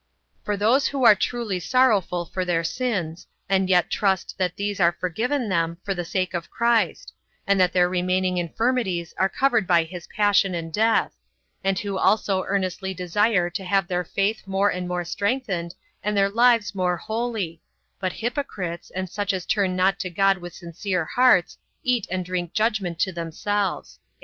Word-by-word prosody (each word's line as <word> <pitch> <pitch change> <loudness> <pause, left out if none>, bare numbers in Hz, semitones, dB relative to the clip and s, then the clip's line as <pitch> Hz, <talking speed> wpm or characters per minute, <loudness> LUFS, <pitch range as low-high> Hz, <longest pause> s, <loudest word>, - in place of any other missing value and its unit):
For 205 -1 -1
those 235 +7 +3
who 275 -2 -2
are 215 - +10
truly 210 -2 -2
sorrowful 195 -5 +2
for 185 +3 -3
their 175 -2 0
sins, 180 -6 -3 0.2
and 190 -1 +1
yet 180 -2 +3
trust 190 -3 0
that 180 -1 0
these 200 0 -3
are 175 -1 +3
forgiven 230 - -1
them 170 -3 0
for 195 - -1
the 175 -2 -3
sake 185 +1 -2
of 170 -1 -4
Christ; 235 -7 0 0.3
and 200 -1 +2
that 180 -1 +4
their 180 -1 +3
remaining 185 0 0
infirmities 185 -1 -1
are 190 - +3
covered 245 -7 +1
by 170 -2 +4
his 170 +1 -9
passion 205 -3 +2
and 165 -1 -5
death; 225 +3 +2 0.5
and 195 0 +1
who 200 -1 -3
also 195 -2 +2
earnestly 190 -1 -2
desire 180 +1 +1
to 190 - -4
have 195 -1 +1
their 180 -1 -1
faith 200 +5 -1
more 195 +1 +2
and 180 0 -4
more 180 -1 -2
strengthened, 195 -3 -2 0.3
and 210 0 -1
their 195 0 +3
lives 235 -1 +3
more 180 -2 0
holy; 220 -6 -3 0.4
but 185 -1 -1
hypocrites, 220 - -4
and 185 0 -2
such 205 +2 -2
as 185 -2 -3
turn 195 -3 +1
not 190 +1 +2
to 185 - -3
God 195 +2 +2
with 175 -1 -9
sincere 175 0 -3
hearts, 245 -5 +3 0.2
eat 245 -4 +1
and 185 0 -2
drink 175 -1 -3
judgment 210 -5 0
to 190 - +1
themselves. 185 +4 -3
190 Hz, 175 wpm, -24 LUFS, 180-210 Hz, 0.5 s, are